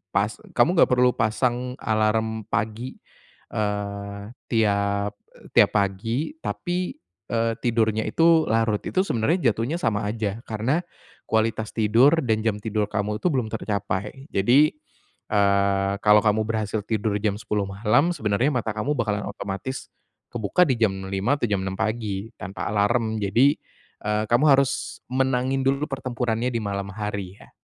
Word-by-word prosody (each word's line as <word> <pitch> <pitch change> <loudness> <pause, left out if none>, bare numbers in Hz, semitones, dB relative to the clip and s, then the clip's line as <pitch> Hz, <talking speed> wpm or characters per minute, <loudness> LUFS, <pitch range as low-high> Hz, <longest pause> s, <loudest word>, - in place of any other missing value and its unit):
pas - - +2 0.2
kamu - - +5
enggak - - +5
perlu 125 0 +4
pasang 125 +3 0
alarm 110 0 0
pagi, 110 +4 -3 0.6
eee, 100 0 -3 0.2
tiap 100 -2 +1 0.4
tiap - - +6
pagi, 115 - -1
tapi, 180 - -3 0.4
eee, 115 0 +1
tidurnya 110 -2 +1
itu 165 -1 +4
larut. 110 -2 +2
Itu, 185 - 0
sebenernya 125 +6 +2
jatuhnya 115 +10 -2
sama 105 -1 0
aja, 105 -1 -2
karena 115 +9 0 0.5
kualitas 110 0 0
tidur 120 +9 +4
dan 110 -2 +1
jam 110 -2 +1
tidur 105 -1 -1
kamu 105 0 -1
itu - - +1
belum 130 -6 0
tercapai. 105 +4 -3
Jadi, 125 +10 +4 0.6
eee, 100 -1 +2
kalau 105 0 +7
kamu 110 0 +3
berhasil 110 -1 -1
tidur 110 -1 -1
jam 105 -1 0
10.00 105 -1 -1
malam, 110 - +2
sebenernya 115 -1 +1
mata 110 -1 -3
kamu 110 +7 -1
bakalan 105 -3 -1
otomatis 100 +6 -5 0.4
kebuka 115 - 0
di 130 - +2
jam 110 -4 +3 0.2
5.00 100 +9 +1
atau - - +3
jam 100 - +1
6.00 95 - -3
pagi 110 -2 -2
tanpa 100 -1 -6
alarm. 110 +2 +1
Jadi, 125 +9 +4 0.5
eee, 105 0 0
kamu 120 +5 +4
harus 135 -1 +1
menangin 130 0 +1
dulu 135 +2 +1
pertempurannya 125 -3 -2
di 115 - -1
malam 100 -1 -3
hari 100 -2 -5
ya. - - -16
110 Hz, 145 wpm, -24 LUFS, 105-125 Hz, 0.6 s, kalau